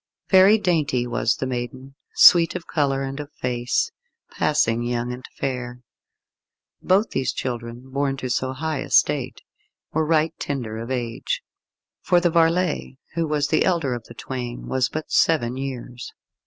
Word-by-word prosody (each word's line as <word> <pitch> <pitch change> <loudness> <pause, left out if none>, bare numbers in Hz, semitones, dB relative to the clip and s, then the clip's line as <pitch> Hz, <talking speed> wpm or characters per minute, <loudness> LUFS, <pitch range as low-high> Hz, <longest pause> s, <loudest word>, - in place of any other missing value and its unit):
Very 195 +3 +7
dainty 155 - +1
was 115 -1 0
the - - -3
maiden, 130 +2 -5 0.2
sweet 170 -1 +7
of 180 - -5
colour 135 -3 0
and 135 +1 -5
of 145 0 -7
face, 120 -3 -1 0.4
passing 115 +1 +1
young 120 0 -2
and 125 +1 -9
fair. 125 -2 -4 1.0
Both 200 +4 +2
these 135 - 0
children, 120 0 -5
born 140 0 -1
to 130 - -4
so 130 +2 -1
high 155 +1 -3
estate, 140 -4 +1 0.5
were 160 - +2
right 160 0 +2
tender 120 -6 -4
of 115 +2 -6
age, 120 -3 -3 0.6
for 175 - +3
the 175 -1 +1
varlet, 165 -3 +1 0.2
who 165 -1 -1
was 150 -1 0
the 155 - +3
elder 165 -8 +1
of 120 -2 -6
the 120 - -13
twain, 125 -1 -6
was 130 -1 0
but 155 0 -6
seven 130 -7 +2
years. 125 -2 -6
135 Hz, 155 wpm, -23 LUFS, 120-155 Hz, 1.0 s, Very